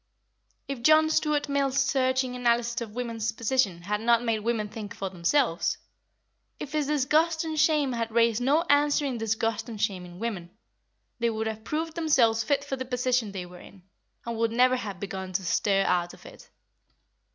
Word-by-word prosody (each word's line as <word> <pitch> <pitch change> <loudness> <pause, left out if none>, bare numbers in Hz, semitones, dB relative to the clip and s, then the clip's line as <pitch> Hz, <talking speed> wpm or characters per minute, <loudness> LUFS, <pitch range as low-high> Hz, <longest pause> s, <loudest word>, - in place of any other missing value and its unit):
If 275 -3 -5
John 310 +4 +5
Stuart 300 -2 +1
Mill's 280 -1 0
searching 260 -2 +1
analysis 235 -1 +1
of 220 -2 -7
women's 230 -2 -2
position 225 -6 0
had 210 +3 -2
not 235 +1 +3
made 225 -2 0
women 220 -1 -1
think 210 -1 -8
for 195 -1 -4
themselves; 180 - +1 0.8
if 280 - -6
his 300 -2 0
disgust 310 +3 +2
and 315 -1 -3
shame 300 -4 +3
had 230 -1 -2
raised 230 0 +2
no 290 +6 +3
answering 285 -4 +2
disgust 225 +1 -1
and 220 -2 -7
shame 190 -3 -1
in 175 0 -11
women, 200 -5 -4 0.7
they 235 0 +1
would 220 0 -3
have 220 0 -4
proved 320 +5 -3
themselves 260 -9 +2
fit 280 +4 0
for 275 -2 -4
the 260 - -3
position 250 -3 0
they 190 -2 -5
were 180 0 -13
in, 190 0 -15 0.4
and 235 -1 -4
would 230 0 +1
never 255 +2 +4
have 205 -7 -5
begun 190 -1 -6
to 190 0 -2
stir 195 +3 +2
out 175 -2 0
of - - -19
it. - - -14
235 Hz, 180 wpm, -27 LUFS, 210-275 Hz, 0.8 s, John